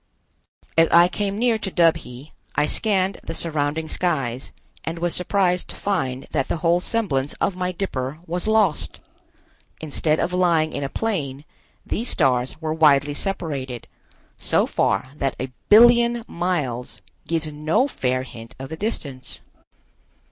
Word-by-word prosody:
As 165 - +6
I 170 +1 +7
came 200 +2 -2
near 230 -1 +2
to 200 - -3
Dubhe, 160 -6 0 0.2
I 150 - +3
scanned 195 +1 +1
the 165 - -5
surrounding 155 -1 -1
skies 135 -9 -1 0.3
and 165 +1 -4
was 170 0 +2
surprised 180 -1 +2
to - - -7
find 135 -10 -2
that 135 -3 0
the - - -1
whole 170 +1 +4
semblance 145 - -1
of 190 - -1
my 180 0 -2
dipper 150 -7 -3
was 175 +4 -3
lost. 215 -8 +1 0.8
Instead 155 0 0
of 180 - -1
lying 170 -4 +2
in - - -3
a 135 - -2
plane, 150 -11 -3 0.4
these 235 +3 -2
stars 130 -3 +1
were 155 -1 -2
widely 145 -2 +4
separated, 145 - -4 0.5
so - - +2
far 100 +7 0
that 135 -2 -1
a 130 0 -4 0.2
billion 235 +1 +6
miles 155 -9 -3 0.2
gives 165 -1 0
no 155 - +1
fair 130 - -1
hint 115 -1 -11
of 135 0 -7
the 160 - -6
distance. 145 - -5
160 Hz, 145 wpm, -23 LUFS, 135-185 Hz, 0.8 s, I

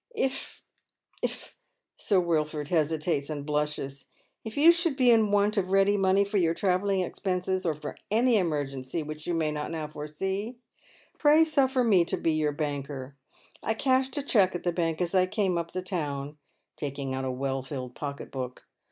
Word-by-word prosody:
If 270 -8 -3 0.3
— - - -34
if - - -2
" - - -12
here - - -14 0.5
Sir 195 -3 +2
Wilford 155 -3 -1
hesitates 155 -2 0
and 145 -2 -4
blushes 150 -2 -2
— - - -33
" - - -52
if 220 +2 -7
you 315 +4 +8
should 340 -4 0
be 255 -2 +5
in 220 -2 +4
want 205 +1 +2
of 185 -2 +1
ready 195 +1 +4
money 195 0 +3
for 200 +1 -1
your 165 -3 +2
travelling 190 +1 +1
expenses, 185 0 -2
or 160 - +1
for 150 - -7
any 230 +2 +3
emergency 145 -4 -2
which 155 +1 -8
you 175 - 0
may 160 -2 0
not 150 0 -3
now 160 -2 -4
foresee, 190 +10 -4 0.6
pray 305 +2 +6
suffer 270 -5 +2
me 200 -7 +5
to - - -2
be 165 - +1
your 155 -1 +1
banker. 140 -2 -4 0.5
I 220 - -1
cashed 260 +3 +1
a 285 - -1
cheque 195 -9 +3
at 175 - -4
tha 175 - +1
bank 165 -1 -1
as 175 0 -1
I 185 -1 +4
came 195 -2 0
up 170 -1 -2
the 185 0 -4
town," 150 -5 -4 0.4
taking 140 -2 -4
out 130 0 -2
a 130 - -1
well 135 +1 -2
filled 130 -2 -6
pocket 140 0 -6
book. 130 -2 -6
170 Hz, 195 wpm, -28 LUFS, 150-205 Hz, 0.6 s, you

